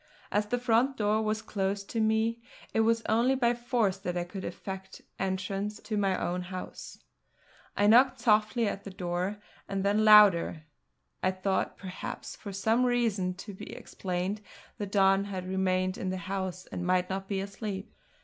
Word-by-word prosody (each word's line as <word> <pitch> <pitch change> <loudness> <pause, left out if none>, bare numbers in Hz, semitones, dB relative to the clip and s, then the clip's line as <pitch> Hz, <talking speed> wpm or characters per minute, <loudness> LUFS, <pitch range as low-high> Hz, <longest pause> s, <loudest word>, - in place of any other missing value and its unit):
As 210 0 +1
the 245 +3 0
front 245 +3 +2
door 215 0 +2
was 215 0 -1
closed 200 0 -2
to 230 - -1
me, 220 +1 +1 0.3
it - - +1
was 230 +1 +3
only 235 +5 +3
by 240 -2 +3
force 235 -5 0
that 180 -2 -3
I 175 - 0
could 185 +2 -7
effect 190 +2 -7 0.2
entrance 195 +2 -2
to 220 - -4
my 195 -2 +1
own 180 +1 -1
house. 185 0 -7 0.8
I 205 - +3
knocked 250 +4 +6
softly 220 +1 +3
at 200 0 -3
the 200 - -7
door, 180 +2 -2 0.3
and 195 -1 -1
then 205 +2 +3
louder; 205 -7 +7 0.6
I 185 - +3
thought 190 0 -1
perhaps, 185 -2 -6
for 200 - -8
some 220 +5 +2
reason 225 -7 +1
to 200 +3 -8
be 205 +2 -9
explained, 185 +3 -3 0.4
the 205 - -2
Don 195 0 +3
had 185 -2 -5
remained 185 0 0
in 185 - -2
the 185 - -2
house 185 0 -4
and 180 - -4
might 180 0 +2
now 190 - 0
be 195 0 -3
asleep. 200 0 -5
200 Hz, 170 wpm, -29 LUFS, 185-220 Hz, 0.8 s, louder